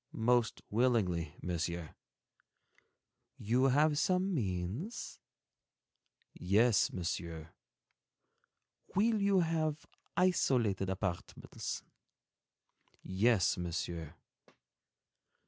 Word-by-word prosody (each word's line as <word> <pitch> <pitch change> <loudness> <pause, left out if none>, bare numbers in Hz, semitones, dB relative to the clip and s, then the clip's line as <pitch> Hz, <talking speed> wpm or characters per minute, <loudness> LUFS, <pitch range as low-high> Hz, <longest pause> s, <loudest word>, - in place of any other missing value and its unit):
"Most 120 0 +1
willingly, 100 -9 +1
Monsieur." 85 -2 -3 1.4
"You 125 +5 +1
have 145 +3 +3
some 185 +2 +1
means?" 105 - -3 1.1
"Yes, 105 +4 +3
Monsieur." 85 -2 -4 1.5
"Will 215 +2 +3
you 200 -2 +4
have 155 -2 -1 0.3
isolated 120 - +2
apartments?" 95 -2 -4 1.2
"Yes, 100 0 +2
Monsieur." 85 -2 -4
110 Hz, 60 wpm, -33 LUFS, -, 1.5 s, you